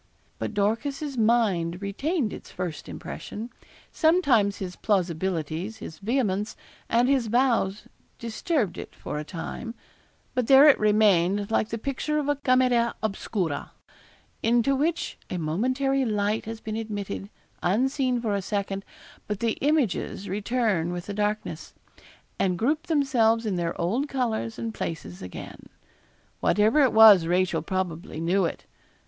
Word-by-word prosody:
But 220 - -4
Dorcas's 275 +8 -1
mind 210 -7 +2
retained 230 - -1
its - - -10
first 175 -5 -5
impression. 230 +3 -7 0.4
Sometimes 285 - +3
his 180 -2 -5
plausibilities, 180 0 -1
his 160 -6 -9
vehemence, 210 -2 -1 0.3
and 240 +2 +3
his 265 -4 +2
vows 230 -4 +1 0.3
disturbed 230 - -1
it - - -9
for 150 - -5
a - - -4
time; 190 +9 -6 0.6
but 250 -3 0
there 275 +2 +8
it 295 - +6
remained 205 -2 +3
like 215 -1 +1
the 230 - -3
picture 275 +5 -2
of 295 -2 -1
a 290 - +2
camera 255 -3 +2
obscura, 195 -6 -2 0.7
into 240 +4 +3
which 320 +5 -1
a 180 - -3
momentary 255 - 0
light 210 -2 0
has 225 +1 -6
been 215 0 -4
admitted, 205 -3 -5 0.3
unseen 255 +6 +1
for 225 -3 -1
a 200 - 0
second, 195 0 -3 0.4
but 210 -2 -3
the 230 -1 +1
images 275 - 0
return 205 -3 0
with 175 -1 -5
the 205 - -5
darkness, 210 +1 -3 0.6
and 180 -2 +1
group 300 - 0
themselves 245 -8 +2
in 210 - 0
their 170 -1 -2
old 235 - 0
colours 230 -4 -2
and 225 -1 -4
places 120 - -5
again. 90 -1 -9 0.7
Whatever 215 - +3
it 265 - +4
was 210 -6 +8
Rachel 175 -2 +1
probably 175 -2 -3
knew 180 +3 +2
it. - - -5
215 Hz, 140 wpm, -26 LUFS, 190-255 Hz, 0.7 s, there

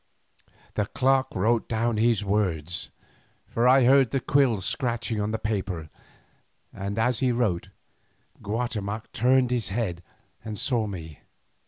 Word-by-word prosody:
The 105 -2 -1
clerk 135 +2 +2
wrote 110 +5 +1
down 115 0 0
his 110 -2 +2
words, 90 -5 -1 0.6
for 120 +2 +1
I 130 +1 +6
heard 135 0 +5
the 135 - 0
quill 130 -4 +2
scratching 115 - -2
on 105 - -1
the 110 - -1
paper, 95 -7 -3 0.8
and 100 +2 -4
as 115 +1 +1
he 130 -2 +2
wrote, 110 -8 0 0.7
Guatemoc 110 -1 -3
turned 125 +1 +3
his 120 -3 0
head 95 -5 -2 0.4
and 110 -1 -5
saw 115 -3 0
me. 80 -6 -8
110 Hz, 135 wpm, -26 LUFS, 100-125 Hz, 0.8 s, I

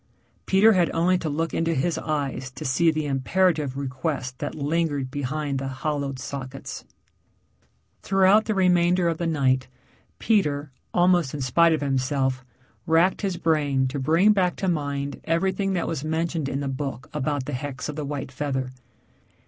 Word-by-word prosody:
Peter 205 +4 +6
had 180 -3 +3
only 175 +3 +3
to 170 -3 -2
look 165 +3 -2
into 165 0 0
his 165 +6 0
eyes 140 -4 -3
to 130 - -9
see 165 +6 +3
the 155 -1 -1
imperative 145 0 +1
request 130 -1 -3
that 145 - -4
lingered 145 -3 -1
behind 145 0 -2
the 135 - -4
hollowed 140 0 -3
sockets. 135 0 -7 1.2
Throughout 195 +3 +4
the 215 - -1
remainder 180 -1 +3
of 165 -1 -1
the 170 - -1
night 130 -5 +1 0.5
Peter, 150 -10 +1 0.2
almost 175 -5 +3
in 145 - -4
spite 165 +6 +4
of 155 - -1
himself, 130 -1 0 0.4
wracked 165 +3 +3
his 190 -4 -1
brain 145 -5 +1
to 140 - -4
bring 165 +10 +4
back 185 -3 +1
to 190 - -3
mind 145 -4 -2
everything 190 +4 0
that 175 -3 -1
was 160 -4 -3
mentioned 160 -1 -1
in 140 +1 -2
the 140 - -2
book 135 -1 -4
about 145 -2 -1
the 145 - -5
hex 140 +1 -4
of 150 - -5
the 150 - -4
white 140 -2 -4
feather. 130 -2 -3
150 Hz, 165 wpm, -25 LUFS, 135-170 Hz, 1.2 s, Peter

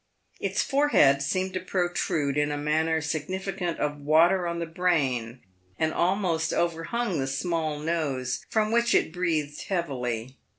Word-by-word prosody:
Its - - 0
forehead 275 - +4
seemed 185 +6 -1
to 185 - -1
protrude 175 -6 -1
in 150 0 +1
a 145 - -2
manner 160 +2 +1
significant 175 +3 -3
of 150 0 -2
water 170 +5 +4
on 170 0 -2
the 170 - -2
brain, 140 -9 0 0.4
and 160 0 0
almost 175 -3 +1
overhung 170 +4 -1
the 135 - -1
small 155 +2 -1
nose, 145 -5 -2
from 215 -1 +1
which 235 0 +3
it 160 - +2
breathed 160 -5 -1
heavily. 130 - -3
160 Hz, 140 wpm, -27 LUFS, 145-180 Hz, 0.4 s, forehead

